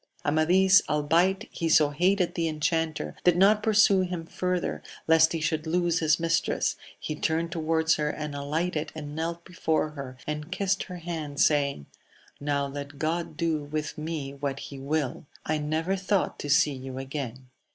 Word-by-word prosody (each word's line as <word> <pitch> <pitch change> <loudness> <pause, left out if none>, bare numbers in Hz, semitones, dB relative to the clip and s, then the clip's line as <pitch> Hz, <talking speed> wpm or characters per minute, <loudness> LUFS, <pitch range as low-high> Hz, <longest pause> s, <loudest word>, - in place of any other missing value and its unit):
Amadis, 185 +6 +5
albeit 170 +7 +2
he 165 - -2
so 150 -2 +5
hated 180 +4 +2
the 165 -1 0
enchanter, 155 - -1
did 175 -1 +4
not 205 +3 +5
pursue 210 -3 +5
him 180 -2 -3
further, 180 +1 -2 0.3
lest 160 0 +6
he 165 - -1
should 155 0 -1
lose 170 0 +1
his 155 -1 +3
mistress, 165 0 +1 0.2
he 155 - -4
turned 165 +2 -1
towards 160 -1 +1
her, 150 -1 0
and 150 -1 -4
alighted 150 +3 -2
and 150 -1 -6
knelt 170 +1 -3
before 160 -3 0
her, 135 -4 -8
and 150 +2 -4
kissed 195 +1 0
her 180 - -7
hand, 160 -4 -5
saying, 140 - +2 0.5
Now 140 -1 0
let 140 +1 -7
God 165 +3 -2
do 165 -4 0
with 150 +1 -4
me 155 -3 -4
what 140 -1 -3
he 140 -1 -8
will! 145 +1 -2 0.2
I 155 0 0
never 160 +5 -1
thought 195 0 0
to 145 - -5
see 145 0 +4
you 130 0 -7
again. 130 -2 -6
155 Hz, 165 wpm, -27 LUFS, 145-170 Hz, 0.5 s, lest